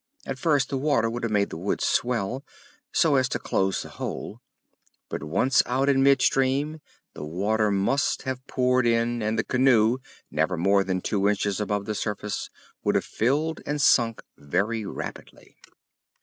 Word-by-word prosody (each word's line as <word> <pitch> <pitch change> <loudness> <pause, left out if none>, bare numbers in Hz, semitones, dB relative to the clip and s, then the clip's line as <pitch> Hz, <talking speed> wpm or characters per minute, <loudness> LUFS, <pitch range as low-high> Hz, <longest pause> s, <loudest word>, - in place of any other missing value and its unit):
At 135 -1 -5
first 145 -3 +2
the 135 - -2
water 130 -6 +1
would 120 +1 -4
have 115 -2 -2
made 100 -1 +1
the - - -5
wood 95 +4 -1
swell 125 +1 0 0.5
so 155 -5 +3
as 130 -1 +2
to - - -1
close 95 0 -1
the - - -10
hole, - - -6 0.7
but - - -4
once 125 - +2
out 135 +3 +1
in 135 -1 +3
mid 135 -1 +4
stream 140 +4 +1 0.3
the - - -8
water 105 +7 0
must 100 +8 +1
have 130 0 -5
poured 125 -1 +2
in, 115 0 +1
and 110 +1 -1
the 110 - +1
canoe, 125 -2 +3 0.3
never 80 +4 0
more 100 +3 +3
than 95 -1 -2
two 100 0 +1
inches 100 -1 0
above 105 -1 -1
the 110 - -2
surface, 105 -1 -3 0.3
would - - +1
have - - +1
filled 150 +8 0
and 145 0 -3
sunk 115 -5 +3
very 100 +9 -2
rapidly. - - -8
115 Hz, 170 wpm, -25 LUFS, 100-135 Hz, 0.7 s, mid